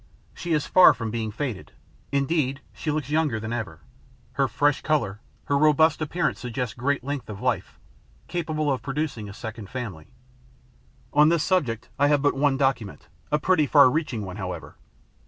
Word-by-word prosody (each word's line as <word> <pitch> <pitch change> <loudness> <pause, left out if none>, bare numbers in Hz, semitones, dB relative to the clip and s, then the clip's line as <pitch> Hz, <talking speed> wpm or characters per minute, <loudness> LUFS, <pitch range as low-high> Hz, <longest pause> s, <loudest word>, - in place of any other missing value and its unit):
She 170 -1 -3
is 150 -2 +1
far 185 -1 +7
from 115 -2 -4
being 115 -1 -2
faded 115 -2 -5 0.4
indeed, 140 -1 0
she 155 - -5
looks 150 -2 -2
younger 150 -7 +1
than 110 +2 -4
ever. 105 -10 -5 0.5
Her - - +1
fresh 145 -1 +1
colour, 115 -10 0 0.3
her 140 - +1
robust 155 +2 +4
appearance 165 +2 -1
suggest 125 -2 -4
great 135 +2 -1
length 140 -2 -4
of 100 -2 -7
life, - - -2 0.5
capable 155 -3 -1
of 130 -4 -1
producing 135 -6 -3
a - - -7
second 110 -3 -7
family. 105 -12 -6 1.1
On 150 +1 +6
this 170 -2 +2
subject 125 - 0
I 145 - +5
have 145 -1 +2
but 145 - +3
one 140 -1 +2
document, 135 -7 -1 0.2
a 150 - +4
pretty 155 -2 +2
far 140 -2 +6
reaching 125 -8 -2
one, 90 0 -7
however. 90 -6 -6
140 Hz, 170 wpm, -25 LUFS, 115-150 Hz, 1.1 s, far